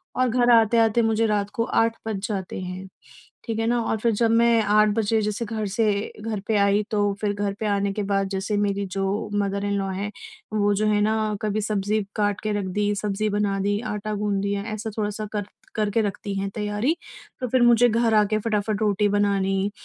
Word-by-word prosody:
और 255 0 +2
घर 245 +1 +2
आते-आते 225 0 +4
मुझे 225 0 +2
रात 205 -1 0
को 230 - 0
8 230 0 +1
बज 215 -3 -2
जाते 190 -4 -4
हैं। 185 +1 -6 0.6
ठीक 225 -2 -3
है 225 - 0
ना? 240 0 +2
और 220 - -1
फिर 230 +1 +2
जब 225 +1 +2
मैं 230 0 +4
8 215 +1 +4
बजे 220 0 +2
जैसे 210 +2 -2
घर 215 -1 -3
से 210 0 0
घर 215 -2 -3
पे 220 - +1
आई 200 +1 +3
तो 205 -1 +1
फिर 205 -1 0
घर 205 -1 -2
पे 220 - -2
आने 200 -1 +1
के 210 - -2
बाद 195 0 0
जैसे 195 +2 -2
मेरी 200 -1 0
जो 195 +3 -2
मदर-इन-लॉ 200 -1 -1
हैं 200 +2 -3 0.4
वो 205 -1 +2
जो 215 +2 +1
हैं 210 -1 +2
ना 215 0 +1
कभी 215 0 -1
सब्ज़ी 210 0 0
काट 205 -2 0
के 215 - -2
रख 195 - -3
दी, 205 +2 0
सब्ज़ी 210 +1 -1
बना 205 -1 0
दी, 205 +1 0
आटा 210 -2 -4
गूँध 205 -1 -1
दिया, 200 0 -1
ऐसा 215 +1 -4
थोड़ा-सा 210 0 -2
कर 205 -2 -2 0.3
करके 215 +1 +1
रखती 205 0 -3
हैं 195 0 -2
तैयारी। 210 +8 0 0.4
तो 255 - -2
फिर 255 0 +2
मुझे 240 0 +6
घर 230 0 +2
आके 210 0 +3
फटाफट 215 -1 -1
रोटी 210 0 +2
बनानी 200 -1 +1
210 Hz, 205 wpm, -24 LUFS, 200-220 Hz, 0.6 s, मुझे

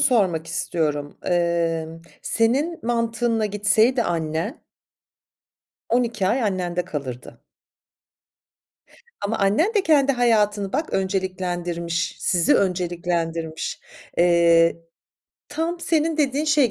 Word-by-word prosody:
sormak 195 - +2
istiyorum. 150 -3 -2
Emm, 165 -2 -1 0.2
senin 275 +9 +1
mantığınla 230 -1 0
gitseydi 215 +5 +2
annen 165 - -2 1.3
12 235 -5 0
ay 245 +3 +1
annende 180 -3 -1
kalırdı. 135 -8 -7 1.8
Ama 205 +3 -2
annen 215 - +2
de 410 - +3
kendi 280 -4 +3
hayatını 210 -5 +1
bak, 315 - -2
önceliklendirmiş, 180 -2 -2
sizi 175 -3 +2
önceliklendirmiş. 170 -3 -2 0.4
Eee, 170 -1 +4 0.7
tam 330 +3 -3
senin 325 -1 +1
dediğin 290 -1 +1
şey 295 -6 +3
195 Hz, 90 wpm, -23 LUFS, 170-240 Hz, 1.8 s, Eee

